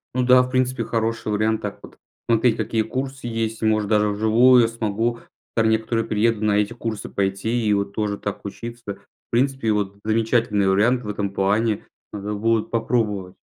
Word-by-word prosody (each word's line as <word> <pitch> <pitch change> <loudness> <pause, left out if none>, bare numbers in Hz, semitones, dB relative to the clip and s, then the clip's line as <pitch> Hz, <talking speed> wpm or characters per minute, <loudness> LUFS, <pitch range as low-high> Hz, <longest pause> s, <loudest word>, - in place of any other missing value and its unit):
Ну 130 - +2
да. 125 0 +6
В 125 - -5
принципе, 130 0 0
хороший 115 -1 -2
вариант 110 +1 +1
так 105 -1 -5
вот. - - -13 0.3
Смотреть, 115 0 +3
какие 110 -1 0
курсы 130 +2 -5
есть, 115 -1 -3
может 110 -2 +1
даже 105 -1 +3
вживую. 115 +4 +5
Я 115 - +3
смогу 115 +1 -2 0.4
там 110 -1 +3
некоторую 110 +1 0
приеду 110 0 +1
на 105 - +2
эти 105 +1 +1
курсы 115 -3 -5
пойти 100 +4 -1
и 105 - +4
вот 100 0 -1
тоже 105 -2 -2
так 105 0 -6
учиться. 115 0 -7
В 100 - -30
принципе, 125 -2 +1
вот 100 -1 -2
замечательный 110 -2 +1
вариант 115 +6 +2
в 105 - -6
этом 100 -1 -2
плане. 105 +3 0 0.3
Надо 105 0 -4
будет 110 +1 0
попробовать. 105 -5 -1
110 Hz, 180 wpm, -22 LUFS, 105-115 Hz, 0.4 s, да